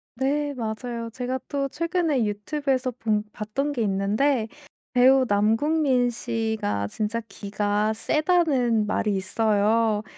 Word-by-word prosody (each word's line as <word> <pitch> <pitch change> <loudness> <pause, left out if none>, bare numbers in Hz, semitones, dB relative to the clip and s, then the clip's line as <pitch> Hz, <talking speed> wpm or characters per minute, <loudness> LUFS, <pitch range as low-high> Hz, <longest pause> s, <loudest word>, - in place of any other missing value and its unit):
네 285 +3 0
맞아요. 230 -1 -4
제가 255 +2 -3
또 280 -1 -1
최근에 330 - 0
유튜브에서 255 +5 -1
본 220 -3 -1
봤던 270 +8 -2
게 250 - -2
있는데 215 +5 +1 0.5
배우 260 +1 +5
남궁민 245 +5 +2
씨가 220 - -2
진짜 215 - -2
기가 205 +1 -1
세다는 265 - +2
말이 210 0 0
있어요. 215 +2 +1
230 Hz, 240 characters per minute, -25 LUFS, 210-275 Hz, 0.5 s, 배우